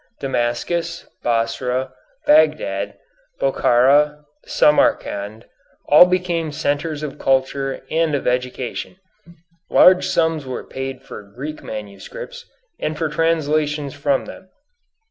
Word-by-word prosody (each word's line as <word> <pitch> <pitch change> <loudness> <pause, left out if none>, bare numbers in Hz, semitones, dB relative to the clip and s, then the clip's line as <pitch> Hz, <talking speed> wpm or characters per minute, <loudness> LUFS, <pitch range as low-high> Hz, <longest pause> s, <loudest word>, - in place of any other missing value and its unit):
Damascus, 140 +7 -2 0.2
Basra, 125 +3 -1 0.3
Bagdad, 150 -11 +2 0.4
Bokhara, 150 - +3 0.2
Samarcand 110 -7 +1 0.5
all 150 +4 +9
became 175 -3 -1
centres 150 +1 -2
of 150 - -6
culture 135 0 0
and 160 -2 +1
of 140 - -3
education. 125 +5 -2 0.7
Large 185 0 +6
sums 160 -2 +1
were 130 - -5
paid 135 -1 -6
for - - -9
Greek 130 +10 -8
manuscripts, 485 - -8 0.3
and 155 0 -3
for 160 -1 -1
translations 150 -2 0
from 140 -1 0
them. 190 - -12
145 Hz, 100 wpm, -20 LUFS, 125-160 Hz, 0.7 s, all